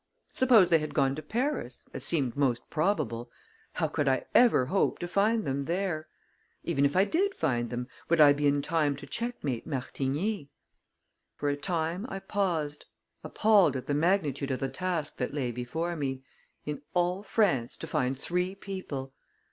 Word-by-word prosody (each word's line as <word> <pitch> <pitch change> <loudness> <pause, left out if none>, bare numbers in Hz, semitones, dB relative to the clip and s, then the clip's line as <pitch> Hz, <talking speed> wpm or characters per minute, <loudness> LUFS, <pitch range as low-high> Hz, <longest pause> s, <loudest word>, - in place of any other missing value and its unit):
Suppose 225 -9 +5
they 165 - +6
had 150 -1 -5
gone 135 -3 +3
to 155 - -5
Paris, 230 - -3
as - - -4
seemed 135 -8 +2
most 130 -4 0
probable, 155 - 0 0.4
how - - 0
could 145 - -1
I 130 -1 +2
ever 235 - +5
hope 190 +9 +1
to 175 - -4
find 210 +4 +2
them 140 +1 -1
there? 170 -2 -2 0.6
Even 140 +1 +1
if 140 - +1
I 190 +2 +5
did 390 - +1
find 120 -2 0
them, 125 0 -4 0.2
would 170 0 +3
I 145 -2 +8
be 145 0 +1
in 140 0 +2
time 150 -2 +1
to 140 - -10
checkmate 145 - -3
Martigny? 145 - -2 0.9
For 145 - -1
a 145 - +1
time, 170 - -2
I 195 - -4
paused, 170 -7 -2 0.4
appalled 205 -10 +4
at 130 -1 -4
the 145 - -1
magnitude 150 -4 +1
of 130 - -1
the 135 - -1
task 175 -5 -3
that 130 +2 -3
lay 130 -4 -1
before 160 +9 -3
me 135 -3 -3 0.4
in 150 -1 -4
all 180 +2 +1
France, 195 - +1
to - - -6
find 130 +1 -1
three 180 +6 -2
people! 170 -10 -6
150 Hz, 170 wpm, -29 LUFS, 135-190 Hz, 0.9 s, I